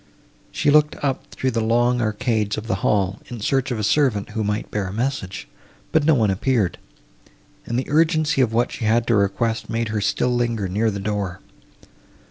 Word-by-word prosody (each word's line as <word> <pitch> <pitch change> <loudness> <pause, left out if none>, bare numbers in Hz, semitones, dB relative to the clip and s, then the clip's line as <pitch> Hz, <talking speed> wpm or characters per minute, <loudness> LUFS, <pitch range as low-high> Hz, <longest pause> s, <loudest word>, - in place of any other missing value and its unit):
She 145 - +1
looked 150 0 +4
up 135 -2 -1
through 130 - -2
the 115 -1 0
long 120 +2 +2
arcades 110 -1 0
of 110 - -5
the 115 - -1
hall, 100 -2 +1
in 120 - -7
search 135 +5 0
of 120 - -2
a 105 - -3
servant, 110 -2 +2
who 110 0 -2
might 105 +1 -2
bear 100 -2 -2
a - - -5
message, 110 -4 -3 0.4
but 160 -2 +2
no 160 -1 +5
one 110 -5 +2
appeared, 110 -1 0 0.9
and 120 - -1
the 130 - -1
urgency 155 -2 +2
of 120 -4 +2
what 120 +2 +1
she 115 - -4
had 115 +2 +2
to 120 - +2
request 105 +3 0
made 115 0 -1
her 110 -1 -1
still 125 +5 +1
linger 115 -4 0
near 105 +5 +1
the 100 -1 -4
door. 100 -2 -3
115 Hz, 195 wpm, -22 LUFS, 105-130 Hz, 0.9 s, no